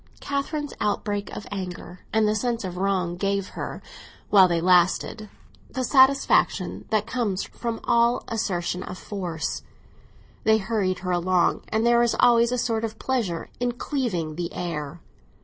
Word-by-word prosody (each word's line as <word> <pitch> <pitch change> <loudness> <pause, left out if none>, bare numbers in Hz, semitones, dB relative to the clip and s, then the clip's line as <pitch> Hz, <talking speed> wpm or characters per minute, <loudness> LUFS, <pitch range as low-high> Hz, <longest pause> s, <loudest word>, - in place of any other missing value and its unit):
Catherine's 285 +1 -3
outbreak 205 -1 -1
of - - -7
anger 180 -2 -6
and 220 -1 +3
the 210 - +2
sense 235 +1 -1
of 185 -2 -5
wrong 185 -2 0
gave 195 0 -1
her, - - -6 0.5
while 195 -3 +8
they 170 -1 +1
lasted, 185 +4 +2 0.4
the 260 - -3
satisfaction 265 +1 +3
that 215 -1 +1
comes 225 -7 -1
from 230 -2 -5
all 235 0 +3
assertion 180 -5 -2
of 185 - -7
force; 175 -7 -4 0.8
they 220 0 +5
hurried 195 -3 -1
her 180 - 0
along, 180 0 +2
and 220 +1 +1
there 235 0 +5
is 240 -1 +2
always 235 -1 +5
a 250 - 0
sort 230 -2 0
of 220 -1 -4
pleasure 220 -12 -2
in 245 0 0
cleaving 195 - -2
the 175 0 -3
air. 165 -2 -4
210 Hz, 150 wpm, -25 LUFS, 180-235 Hz, 0.8 s, while